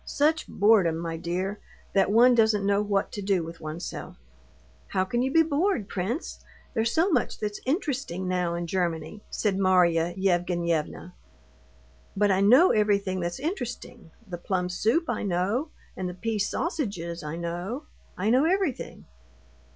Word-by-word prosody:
Such 310 +3 +1
boredom, 200 -6 +3
my 165 0 -4
dear, 180 +5 -3 0.3
that 195 -1 +3
one 240 +4 +6
doesn't 220 -3 +3
know 200 0 +2
what 205 -1 0
to 205 - -5
do 195 -3 +1
with 165 +1 -9
oneself." 155 +2 -6 0.7
"How 185 -1 0
can 240 +5 -1
you 265 +1 0
be 325 +3 +5
bored, 310 - 0
prince? 215 - -3 0.3
There's 225 -1 +1
so 345 +5 +2
much 255 -8 0
that's 210 -1 -4
interesting 260 - -2
now 180 -2 0
in 170 0 -3
Germany," 170 +1 -2
said 200 -3 -1
Marya 175 -3 +3
Yevgenyevna. 175 -4 -1 1.0
"But 205 0 +3
I 190 0 +2
know 255 - +6
everything 200 -3 +1
that's 175 0 -3
interesting: 245 - -5 0.2
the 175 -2 -6
plum 180 0 -1
soup 225 - +1
I 240 - -2
know, 200 - 0 0.3
and 185 -1 -3
the 180 - -7
pea 220 +3 -2
sausages 200 - -2
I 150 +1 -4
know. 175 - -4 0.3
I 205 +4 +1
know 260 +5 +4
everything." 365 -6 -1
200 Hz, 150 wpm, -26 LUFS, 175-240 Hz, 1.0 s, one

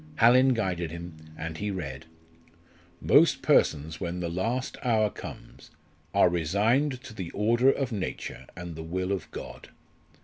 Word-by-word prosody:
Hallin 130 +1 +5
guided 90 -6 -1
him 85 0 -8 0.2
and 80 -1 -5
he 105 - -2
read 80 -6 -5 1.0
"_Most - - +5
persons 80 +1 +2
when 90 0 -3
the 85 -1 -2
last 115 +9 -2
hour 110 -5 +2
comes - - -10 0.4
are 100 - +5
resigned 110 - +1
to 110 - -10
the 95 -5 -5
order 120 +5 +3
of 135 -2 -2
nature 100 -4 -5
and 85 -2 -7
the 80 - -6
will 90 +4 -3
of 95 -4 -3
God. - - -9
95 Hz, 145 wpm, -28 LUFS, 85-115 Hz, 1.0 s, Hallin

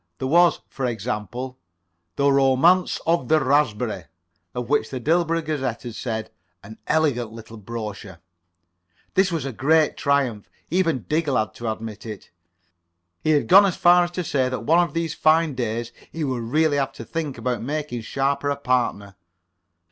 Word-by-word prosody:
There 130 - -3
was, 175 +4 +4
for 130 -2 -3
example, 120 +3 -4 0.6
"The 140 0 +3
Romance 140 +7 +3
of 165 -6 +1
the 155 +3 +4
Raspberry," 125 - 0 0.5
of 125 -1 -3
which 140 -5 +1
the 130 - -4
Dilborough 165 +3 +1
Gazette 135 -6 -3
had 120 -2 -6
said: 110 -2 -4 0.3
"An 110 +2 -12
elegant 140 -8 +1
little 115 0 -11
brochure." 105 -3 -7 1.0
This 190 -1 +3
was 160 -5 -2
a 135 - -4
great 155 +6 +2
triumph. 135 -7 0 0.2
Even 165 - +1
Diggle 150 -4 +1
had 110 - -1
to 115 -2 -3
admit 110 0 -7
it. 105 -2 -9 0.9
He - - 0
had 150 -2 +3
gone 195 +1 +7
so - - -9
far 175 0 +5
as 175 - -7
to 180 - 0
say 130 -5 0
that 130 - -4
one 165 +3 +4
of 170 -4 0
these 165 -1 -1
fine 160 -1 +3
days 120 -1 -3 0.2
he 165 - -4
would 130 -5 -2
really 150 +4 +2
have 135 -1 -1
to 115 - -9
think 155 -2 -4
about 125 -1 -2
making 145 -2 -3
Sharper 140 +4 -1
a 140 - 0
partner. 125 -7 -1
135 Hz, 170 wpm, -23 LUFS, 115-155 Hz, 1.0 s, gone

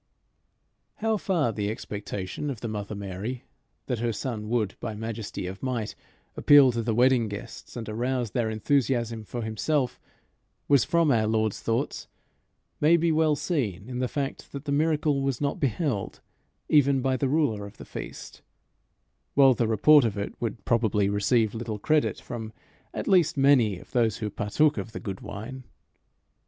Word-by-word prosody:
How 220 0 0
far 170 - 0
the 105 -2 -2
expectation 105 +4 -5
of 125 -6 -5
the 115 - -3
mother 105 -1 -4
Mary 100 +5 -5 0.4
that 125 -4 -2
her 120 0 0
son 110 -2 -4
would, 110 -4 0
by 110 - -4
majesty 110 -3 -5
of 95 +2 -6
might, 120 -5 -2 0.4
appeal 145 -3 +7
to 115 -1 -2
the 115 -1 -1
wedding 125 -1 +4
guests, 100 +3 -8
and 115 - -5
arouse 120 +1 -1
their 120 -3 0
enthusiasm 115 0 0
for 120 +2 -5
himself, 125 +5 -1 0.7
was 140 -3 +5
from 170 -3 +2
our 110 -3 +2
Lord's 110 -1 0
thoughts, 115 0 -2 0.7
may 165 +3 +5
be 170 0 +2
well 155 -1 +3
seen 115 - -2
in 125 -1 -4
the 130 - 0
fact 140 +1 -4
that 140 +1 -6
the 145 - -2
miracle 150 -1 +2
was 135 -3 -1
not 140 -1 -1
beheld 135 - -1 0.5
even 140 -2 +4
by 130 -1 +2
the 130 +1 0
ruler 125 -9 +1
of 100 - -15
the - - -10
feast; - - -8 0.9
while 135 -2 +7
the 120 -1 0
report 140 +7 +6
of 110 -3 -1
it 100 - -3
would 115 -3 -4
probably 110 -4 +2
receive 105 +2 +2
little 115 -2 -4
credit 155 +8 +1
from 110 -2 -7 0.4
at - - -5
least 180 -6 +4
many 130 -8 +4
of - - -15
those 115 -4 +2
who 105 -3 -4
partook 145 +9 +1
of 115 - -7
the - - -5
good 95 -2 -6
wine. 120 +6 -7
120 Hz, 170 wpm, -27 LUFS, 110-140 Hz, 0.9 s, appeal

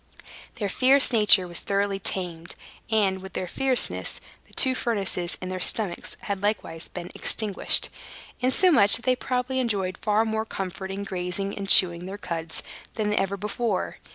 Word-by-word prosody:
Their 210 -3 -3
fierce 260 +6 +4
nature 210 -4 +5
was 175 -1 -3
thoroughly 200 0 -1
tamed; 175 -3 -2 0.3
and, 200 -4 +1
with 190 -1 -10
their 185 - -3
fierceness, 260 +6 0 0.3
the - - -25
two 260 - +4
furnaces 195 -8 -1
in 185 - -6
their 185 0 -4
stomachs 190 -1 0
had 200 -2 -4
likewise 200 -6 -3
been 175 -1 -8
extinguished, 210 -4 +1 0.5
insomuch 255 - +4
that 230 - -7
they 255 -1 +3
probably 255 +1 -2
enjoyed 195 -7 -2
far 215 +1 +1
more 220 0 -2
comfort 190 -3 -6
in 195 +1 -5
grazing 185 +1 -4
and 195 -1 -6
chewing 175 -1 +6
their 195 +2 -7
cuds 165 -4 -5 0.3
than 210 -1 -1
ever 200 -1 -1
before. 210 +1 -3
200 Hz, 155 wpm, -25 LUFS, 185-225 Hz, 0.5 s, chewing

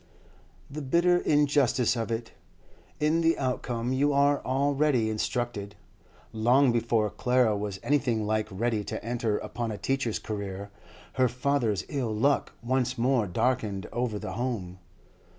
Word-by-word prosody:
The 150 +2 -6
bitter 170 +6 +3
injustice 140 -6 +2
of 115 -2 -2
it! 115 0 -3 0.7
In 155 +2 +2
the 165 0 +3
outcome 125 -2 -2
you 145 +2 +2
are 140 0 +3
already 135 -3 +1
instructed. 110 -2 -3 0.6
Long 120 +4 +4
before 115 -2 +1
Clara 125 -3 +2
was 100 -2 -4
anything 120 -7 +1
like 110 0 0
ready 110 +2 -1
to 100 - -5
enter 115 -3 -1
upon 120 0 -4
a 105 - -5
teacher's 135 -3 -1
career, 100 -1 -5 0.5
her 130 - +6
father's 125 -6 0
ill 125 -7 -2
luck 140 +6 +1
once 130 +1 0
more 120 -2 +2
darkened 110 -2 -1
over 120 -3 -1
the - - -5
home. 110 -7 -4
120 Hz, 135 wpm, -28 LUFS, 110-135 Hz, 0.7 s, her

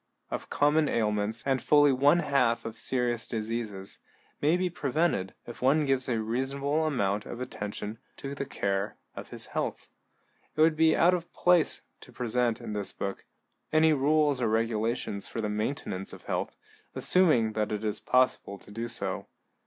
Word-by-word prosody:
of - - -4
common 150 +1 +3
ailments, 105 0 0
and 135 -2 +1
fully 145 -1 +5
one 145 +6 +4
half 125 -6 +1
of 115 -1 -5
serious 120 0 -1
diseases, 110 -3 -4 0.4
may 155 +4 +3
be 185 0 0
prevented 150 - -1
if 120 - -10
one 145 +4 +3
gives 135 -1 +1
a 115 -2 +1
reasonable 135 +7 -1
amount 105 -8 0
of 120 - -7
attention 105 -3 -5 0.2
to 140 0 -5
the 140 - -3
care 100 -5 -2 0.2
of - - -8
his - - -4
health. - - -3 0.7
It 155 - +1
would 160 0 +5
be 160 0 +4
out 175 +2 +5
of 175 -1 -3
place 175 -3 +3 0.2
to - - -14
present, 120 -1 0
in - - -6
this 105 -1 -3
book, 100 0 -5 0.5
any 155 0 +5
rules 145 -1 +2
or 120 - +2
regulations 110 -2 -1
for - - -5
the 105 -2 -1
maintenance 105 -3 -3
of - - -11
health, - - -3 0.4
assuming 150 -12 +3
that 105 0 -1
it 105 0 -3
is 105 -1 -1
possible 125 -5 +1
to 100 - -12
do 115 +3 -4
so. 120 0 -2
125 Hz, 170 wpm, -29 LUFS, 110-145 Hz, 0.7 s, fully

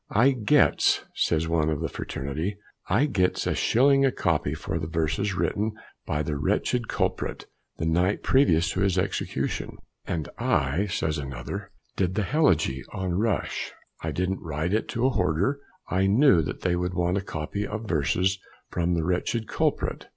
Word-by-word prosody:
"I 120 +6 +4
gets," 130 +3 +3
says 80 0 +1
one 80 -2 +1
of 75 -2 -1
the - - -1
fraternity, 80 +9 -4 0.3
"I 110 +10 +3
gets 95 -11 +1
a - - +1
shilling 135 +3 +4
a 135 - +4
copy 80 -8 0
for 80 - -3
the 80 - -4
verses 85 +5 -1
written 105 +3 0 0.3
by 75 +1 0
the 75 -1 -2
wretched 120 - 0
culprit - - -2 0.3
the 80 - -2
night 90 +5 +1
previous 85 - +3
to 95 - -3
his 95 -1 +2
execution." 95 +1 -2 0.3
"And 80 -3 -2
I," 70 +10 +1
says 80 -5 -1
another, 70 +9 -6 0.3
"did 95 -1 0
the 105 - +1
helegy 90 - +2
on 95 -1 -3
Rush. 105 +3 -1 0.3
I - - -2
didn't 90 +1 -1
write 80 +3 -2
it 110 - +1
to 120 +3 +1
horder; 100 - +1 0.3
I 95 +1 +1
knew 105 - +5
that 75 - -5
they 90 -1 +1
would 90 +1 -2
want 90 +1 +1
a - - -4
copy 100 +3 -4
of 110 +1 -5
verses 90 +4 +1 0.3
from 85 0 0
the 85 - 0
wretched 90 +5 -1
culprit. - - -1
90 Hz, 165 wpm, -26 LUFS, 80-105 Hz, 0.3 s, knew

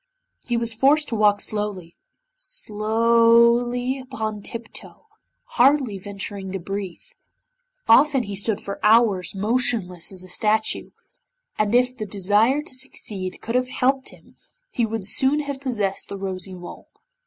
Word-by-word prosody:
He 240 -1 0
was 230 -1 -1
forced 285 +6 +3
to 230 - -2
walk 205 -1 +3
slowly 205 -5 -3 0.4
slowly 235 - +2
upon 220 -5 -5
tip 230 +2 -5
toe, - - -9 0.4
hardly 255 -5 +2
venturing 200 0 -6
to 195 - -3
breathe. 195 - -6 0.8
Often 270 +3 +5
he 200 -2 -6
stood 205 +1 -1
for 200 - -7
hours 210 -4 +3
motionless 205 -5 0
as 185 -1 -7
a - - -11
statue, 215 +4 +1 0.7
and 215 +2 +2
if 250 +1 +3
the 215 - -5
desire 210 +8 +2
to 300 - -11
succeed 210 -8 -4
could 230 - -3
have 250 0 +1
helped 260 +1 0
him - - -19 0.3
he 235 -2 0
would 220 -3 -4
soon 270 +8 +2
have 280 -2 -6
possessed 210 -8 -2
the 200 - -5
Rosy 190 -1 -5
Mole. 175 -1 -11
220 Hz, 140 wpm, -23 LUFS, 200-250 Hz, 0.8 s, Often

